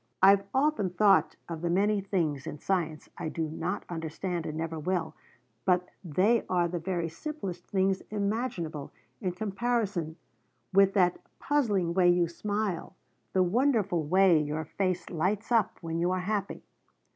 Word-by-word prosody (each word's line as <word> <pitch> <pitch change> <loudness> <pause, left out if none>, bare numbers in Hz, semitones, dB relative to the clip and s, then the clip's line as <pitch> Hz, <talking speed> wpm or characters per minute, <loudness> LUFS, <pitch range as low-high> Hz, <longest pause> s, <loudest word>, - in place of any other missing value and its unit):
I've 195 +1 +7
often 275 -7 +2
thought 180 -3 +4
of 165 -2 -5
the 170 - -1
many 200 +3 +2
things 165 -8 -1
in - - -5
science 165 -2 -2
I 165 -2 -2
do 165 - -2
not 165 +5 -3
understand 165 +1 -4
and 155 - -4
never 165 0 -3
will, 160 -1 -1 0.5
but 180 -1 +2
they 195 +8 +2
are 175 -2 +2
the 175 0 -3
very 170 -1 -2
simplest 180 - -6
things 190 -1 +1
imaginable 200 - -2 0.3
in 180 - -1
comparison 200 -4 -1 0.6
with 195 +1 +5
that 180 -3 +3 0.2
puzzling 205 -12 +1
way 180 -1 +4
you 175 -1 +3
smile, 200 0 -3 0.4
the 185 - +4
wonderful 205 - +2
way 180 0 +5
your 150 +1 -3
face 185 0 -2
lights 190 +7 -1
up 225 -4 +2
when 165 -1 -3
you 175 +1 +2
are 185 0 0
happy. 200 +1 -2
185 Hz, 150 wpm, -29 LUFS, 165-200 Hz, 0.6 s, I've